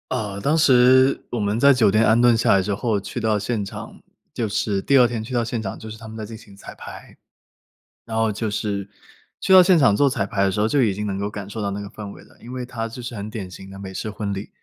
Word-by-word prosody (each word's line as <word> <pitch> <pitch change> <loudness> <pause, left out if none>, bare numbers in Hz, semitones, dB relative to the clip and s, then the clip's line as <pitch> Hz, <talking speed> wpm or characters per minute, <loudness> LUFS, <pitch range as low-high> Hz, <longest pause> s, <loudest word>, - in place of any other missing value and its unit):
呃， 100 -2 -3
当 150 +8 +1
时 130 -2 +5
我 120 - -3
们 105 +1 0
在 140 +4 +6
酒 115 -5 +3
店 110 +3 +3
安 110 +1 +4
顿 120 -1 +5
下 115 - +2
来 100 - +4
之 100 +2 -2
后 110 -1 -1
去 100 - -9
到 110 -1 +1
现 105 +1 -2
场， 100 - -9 0.3
就 115 - -2
是 100 -1 -1
第 140 - +3
2 125 -2 +6
天 115 -2 -4
去 125 +4 -8
到 120 - +2
现 115 0 -3
场 95 -3 -6
就 110 - -9
是 110 - -8
他 115 - -12
们 110 - -9
在 110 - -5
进 110 +1 -9
行 110 -3 -16
彩 100 - -12
排。 - - -11 0.9
然 110 -1 -4
后 110 -1 +2
就 110 +1 -3
是 100 -1 -3 0.5
去 190 - +2
到 185 - +10
现 180 0 +5
场 135 -9 +4
做 140 +5 +3
彩 125 -7 -1
排 100 -1 -1
的 95 - +2
时 95 - -3
候， 105 - +2
就 140 +4 +2
已 105 -6 +1
经 105 +1 -4
能 100 -1 -3
够 100 +1 -2
感 105 -2 -7
受 110 +2 -6
到 100 - -1
那 100 +1 -4
个 100 - -6
氛 105 -2 -8
围 - - -13
了， - - -22
因 120 +2 -10
为 125 -1 -4
他 115 -2 -5
就 125 +2 -9
是 120 - -6
很 105 0 -6
典 100 -4 -7
型 95 +1 -11
的 95 - -10
美 95 -1 -8
式 110 - -4
婚 105 -1 -4
礼， 100 +2 -6
110 Hz, 310 characters per minute, -22 LUFS, 100-120 Hz, 0.9 s, 到